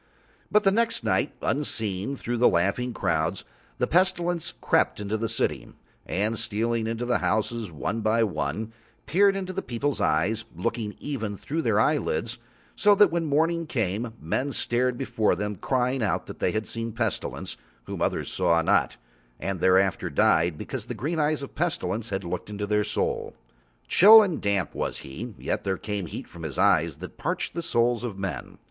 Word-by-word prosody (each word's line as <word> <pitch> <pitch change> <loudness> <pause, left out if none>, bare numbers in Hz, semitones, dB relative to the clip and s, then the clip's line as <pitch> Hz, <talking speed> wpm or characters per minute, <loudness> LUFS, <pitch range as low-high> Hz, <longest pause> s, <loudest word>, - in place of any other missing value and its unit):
But 210 0 +4
the 195 - +5
next 230 +2 +1
night, 145 - +1
unseen, 110 -5 -1
through 120 -2 -3
laughing 105 +4 +2
crowds, 80 -8 -1 0.3
the - - +1
Pestilence 175 -1 +1
crept - - +2
into 105 +1 -2
the 115 0 -2
city, 75 - -1 0.4
and 105 +4 0
stealing 115 +1 -1
into 115 +2 -2
the 120 0 +1
houses 110 -1 -1
one 100 +8 -3
by 110 +2 +2
one, 105 +2 -2 0.3
peered 195 +4 +4
into 185 -1 -4
the - - -2
people's 130 +4 -2
eyes, 100 +9 +1
looking 110 +3 -3
even 110 -8 -4
through 160 +10 -3
their - - +2
eyelids, 475 0 0 0.4
so 205 -1 +5
that 200 -3 +5
when 170 -1 0
morning 165 +3 +1
came 110 -2 -2
men 130 - -1
stared 125 +1 +1
before 115 -5 +1
them 105 0 -3
crying 130 +4 0
out 105 - 0
that - - -10
they - - +1
saw 110 +2 -2 0.2
the 115 - -4
Pestilence 110 -3 -2 0.3
whom - - -6
others - - -1
saw 85 0 +3
not, - - +2 0.4
and 95 -2 -3
thereafter 95 +1 +3
died, 80 -1 +3
because - - -6
the - - -4
green 160 +4 -2
eyes 150 -1 +1
of 140 - -6
the - - -29
Pestilence 115 - -1
had 100 -1 -2
looked 85 +3 -5
into 105 0 -3
their 105 0 +1
souls. - - -2 0.5
Chill 215 +4 +9
and 180 -6 -2
damp 100 -2 0
was - - -3
he, 100 - -7
yet - - -2
there 95 -1 -1
came 105 -4 -4
heat - - -7
from 85 - -12
his 80 -4 -5
eyes - - +3
that - - -10
parched - - -2
the 170 - -3
souls 120 -6 +1
of 110 -5 -4
men. 90 -10 -5
115 Hz, 180 wpm, -26 LUFS, 100-145 Hz, 0.5 s, Chill